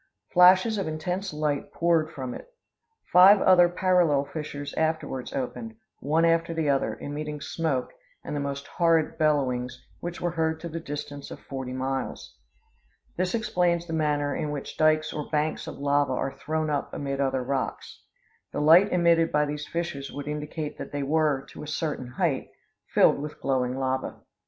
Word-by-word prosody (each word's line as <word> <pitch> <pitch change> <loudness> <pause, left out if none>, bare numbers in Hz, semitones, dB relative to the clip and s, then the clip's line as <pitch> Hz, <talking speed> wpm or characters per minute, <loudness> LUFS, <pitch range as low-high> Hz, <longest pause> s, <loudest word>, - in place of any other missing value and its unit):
Flashes 185 +4 +6
of 195 - -2
intense 180 +5 -3
light 150 -2 -2
poured 165 -2 +2
from 130 -4 -5
it. - - -10 0.6
Five 190 +3 +9
other 180 -2 +6
parallel 175 -6 +2
fissures 145 -2 -6
afterwards 160 -5 -2
opened, 225 - -4 0.2
one 160 +4 +2
after 165 0 +2
the 160 -2 0
other, 135 - 0
emitting 150 +1 -5
smoke, 145 -4 -2 0.3
and - - -5
the - - -1
most 140 0 -4
horrid 165 -2 +1
bellowings, 125 -5 0
which 175 0 -5
were 175 - -1
heard 160 -1 -1
to 170 - -5
the 165 +1 -4
distance 145 -2 -6
of - - -8
forty 130 -2 -6
miles. 130 +1 -4 0.8
This 185 +3 0
explains 175 -6 +1
the 165 - -6
manner 150 -2 0
in 150 - -2
which 145 -2 -5
dykes 155 0 +2
or 150 -1 -5
banks 155 0 -1
of - - -7
lava 145 -1 +1
are 135 +1 -2
thrown 155 0 -2
up 145 -1 -2
amid 140 -1 -2
other 135 -1 0
rocks. 135 +1 -4 0.5
The - - -3
light 165 +7 +6
emitted 170 -2 +3
by 150 0 +3
these 150 0 -5
fissures 165 -5 -4
would 145 0 -7
indicate 150 +1 -5
that - - -7
they 145 -1 -2
were, 145 -2 +1
to - - -10
a 150 - -7
certain 150 -4 -3
height, 120 - -1 0.4
filled - - +4
with 150 +1 -7
glowing 130 -1 0
lava. 130 0 -2
150 Hz, 170 wpm, -26 LUFS, 140-165 Hz, 0.8 s, Five